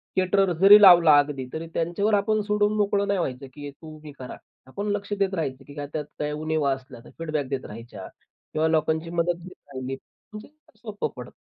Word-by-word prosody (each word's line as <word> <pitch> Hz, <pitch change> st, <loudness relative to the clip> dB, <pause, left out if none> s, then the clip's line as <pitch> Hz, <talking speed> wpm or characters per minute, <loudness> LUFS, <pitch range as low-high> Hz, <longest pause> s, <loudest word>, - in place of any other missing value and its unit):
Caterers 185 Hz, -2 st, +2 dB
जरी 205 Hz, +2 st, +9 dB
लावला 170 Hz, -6 st, +8 dB
अगदी 140 Hz, -3 st, -2 dB
तरी 165 Hz, +1 st, -5 dB
त्यांच्यावर 175 Hz, +6 st, 0 dB
आपण 210 Hz, +1 st, +2 dB
सोडून 210 Hz, 0 st, +2 dB
मोकळं 200 Hz, -1 st, +1 dB
नाही 200 Hz, -2 st, 0 dB
व्हायचं, 135 Hz, -3 st, -4 dB
की 145 Hz, -1 st, -8 dB
तू 155 Hz, +2 st, -13 dB
हे 150 Hz, -, -8 dB
कर -, -, -8 dB
आता. -, -, -8 dB, 0.3 s
आपण 200 Hz, +9 st, -5 dB
लक्ष 205 Hz, 0 st, -3 dB
देत 195 Hz, -1 st, +1 dB
राहायचं, 135 Hz, -7 st, -3 dB
की 145 Hz, -, -12 dB
त्यात 145 Hz, +1 st, -5 dB, 0.2 s
काही 150 Hz, 0 st, -2 dB
उणिवा 155 Hz, -2 st, -1 dB
असल्या 130 Hz, -2 st, -10 dB
तर -, -, -13 dB
फीडबॅक 155 Hz, -4 st, -2 dB
देत 135 Hz, -1 st, -3 dB
राहायच्या 115 Hz, +3 st, -10 dB
किंवा 155 Hz, +1 st, -5 dB
लोकांची 160 Hz, +1 st, 0 dB
मदत 170 Hz, 0 st, 0 dB
घेत 185 Hz, -, -11 dB, 0.2 s
राहिली, 130 Hz, +1 st, -4 dB, 0.4 s
म्हणजे 210 Hz, 0 st, -9 dB, 0.3 s
सोपं 215 Hz, -3 st, -4 dB
पडतं. -, -, -9 dB
165 Hz, 195 wpm, -25 LUFS, 145-200 Hz, 0.4 s, जरी